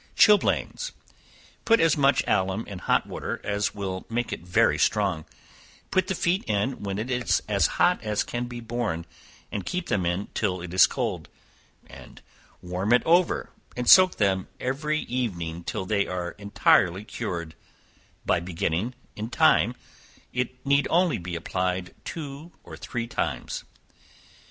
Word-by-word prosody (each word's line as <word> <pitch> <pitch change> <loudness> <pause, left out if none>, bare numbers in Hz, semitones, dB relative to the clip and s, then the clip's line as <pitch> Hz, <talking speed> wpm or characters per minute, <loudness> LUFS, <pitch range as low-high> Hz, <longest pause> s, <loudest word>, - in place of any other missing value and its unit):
Chilblains. 215 - +3 0.7
Put 230 0 +4
as 165 -1 +4
much 140 -1 +3
alum 95 +3 0
in 100 -3 -8
hot - - +1
water - - -5
as 105 0 -1
will 95 -2 -4
make 120 +1 -2
it - - -4
very 90 +1 +2
strong, 95 -7 +1 0.7
put 185 -1 +2
the 190 - -1
feet 175 +3 +1
in 110 +5 -1
when 100 -1 -3
it 115 +5 -3
is 125 -2 +1
as 100 -2 +3
hot 180 0 +3
as 105 -2 0
can 120 0 -3
be 120 -1 -7
borne, 115 -8 -3 0.5
and 100 - -3
keep 180 - -3
them 95 -3 +1
in 90 +4 -2
till 95 -4 -1
it 85 0 -7
is 95 - +7
cold, - - -3 1.3
warm 90 +5 0
it 125 - +4
over, 170 +1 +2 0.3
and 125 -1 -2
soak 185 -1 +8
them 95 -3 +1
every 150 +4 -1
evening 85 -10 -3
till 95 - -3
they 100 0 +1
are 90 -1 -3
entirely 100 -2 +3
cured, 85 -8 -5 0.7
by - - +2
beginning 90 +6 -2 0.2
in 110 +2 -5
time, - - +4 0.6
it 125 +1 -3
need 140 +1 +3
only 170 - +2
be 85 0 -5
applied 90 +1 -2
two 150 +1 -7
or - - -10
three 120 -2 -4
times. - - -3
105 Hz, 150 wpm, -26 LUFS, 95-130 Hz, 1.3 s, soak